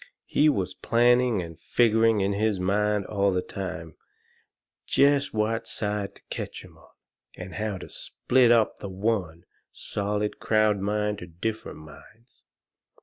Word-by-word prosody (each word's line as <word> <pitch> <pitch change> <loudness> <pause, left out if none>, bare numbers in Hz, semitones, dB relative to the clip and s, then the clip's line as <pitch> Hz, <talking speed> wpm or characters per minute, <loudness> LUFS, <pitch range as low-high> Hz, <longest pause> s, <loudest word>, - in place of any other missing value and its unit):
He 155 - +3
was 95 -9 -1
planning 120 -3 +3
and 85 -1 -10
figgering 115 -2 +3
in 100 +1 +1
his 105 -1 0
mind 105 +2 +1
all 100 0 +1
the 90 -1 0
time 85 -5 -6 0.9
jest 140 0 +3
what 110 +1 -1
side 105 -2 -3
to - - -17
ketch - - -5
'em - - -17
on, - - -20 0.5
and 90 0 -8
how 105 -2 -3
to 90 - -9
split 125 -1 +1
up 115 -2 +3
the 100 - -6
one, 95 -4 -2 0.3
solid 105 +1 -3
crowd 110 -2 +2
mind 105 +1 -1
into 90 - -7
different 105 +6 -5
minds. 95 - -16
105 Hz, 145 wpm, -26 LUFS, 95-115 Hz, 0.9 s, He